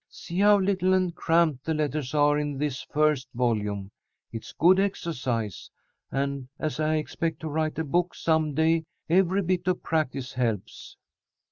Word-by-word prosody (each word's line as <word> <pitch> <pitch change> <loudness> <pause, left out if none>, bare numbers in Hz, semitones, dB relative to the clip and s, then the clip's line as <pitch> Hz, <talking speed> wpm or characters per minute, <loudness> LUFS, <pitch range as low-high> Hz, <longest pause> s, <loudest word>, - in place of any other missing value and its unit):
See 175 +2 -6
how 205 +1 +6
little 185 -1 +2
and 185 -2 +1
cramped 160 -5 +2
the 160 0 -1
letters 150 -2 -2
are 145 0 +4
in 145 -2 -3
this 140 -2 -2
first 150 -3 +1
volume. 105 -5 -1 0.4
It's 115 -1 -7
good 180 +4 +4
exercise, 130 - -2 0.4
and, 140 -1 -2
as 155 0 -3
I 155 0 +1
expect 160 +1 -2
to 160 - -4
write 155 +1 -1
a 160 - 0
book 175 +4 0
some 160 -3 +1
day, 160 +1 +2 0.3
every 190 +2 +3
bit 180 0 -1
of 185 - 0
practice 140 -5 -1
helps." 115 -6 -3
155 Hz, 155 wpm, -26 LUFS, 135-170 Hz, 0.4 s, how